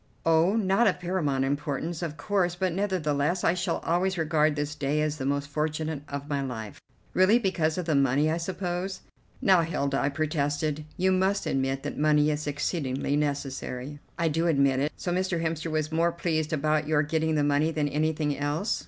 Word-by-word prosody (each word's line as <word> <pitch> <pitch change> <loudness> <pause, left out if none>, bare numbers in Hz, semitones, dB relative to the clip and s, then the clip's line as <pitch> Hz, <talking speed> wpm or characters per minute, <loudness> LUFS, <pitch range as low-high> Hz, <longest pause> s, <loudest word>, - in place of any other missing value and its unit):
"Oh, 165 +5 +4
not 215 +1 +3
of 185 - +1
paramount 160 -7 0
importance, 145 +4 -2
of 160 -3 -4
course, 180 +1 0
but 185 -1 -1
nevertheless 175 -4 0
I 165 - +4
shall 180 -1 -1
always 185 +2 +1
regard 155 -2 +2
this 145 0 -2
day 145 0 -1
as 155 0 0
the 135 -2 -3
most 140 0 -1
fortunate 155 0 -2
of 140 0 -5
my 145 -2 -1
life." 115 -6 -6 0.3
"Really? 185 +5 +5
Because 180 -8 0
of 180 - -2
the 160 - +1
money, 140 +1 +3
I 165 - 0
suppose?" 180 +1 -3 0.4
"Now, 185 -3 +6
Hilda," 140 -4 -1
I 140 - +1
protested, 150 0 -1
"you 190 +1 +2
must 190 +2 +1
admit 135 0 -1
that - - -4
money 150 0 +4
is 150 0 -3
exceedingly 145 -2 -1
necessary." 140 -1 -3 0.2
"I 170 - +1
do 165 +2 +1
admit 140 -4 +3
it. 145 +3 0
So 175 - -3
Mr. 185 -1 0
Hemster 165 0 -2
was 155 0 -1
more 165 +2 +2
pleased 160 -2 -1
about 155 0 +1
your 155 -1 +3
getting 160 +1 0
the 150 - +2
money 145 +2 +2
than 155 -2 0
anything 150 0 0
else?" 145 +8 -1
155 Hz, 190 wpm, -27 LUFS, 145-175 Hz, 0.4 s, Now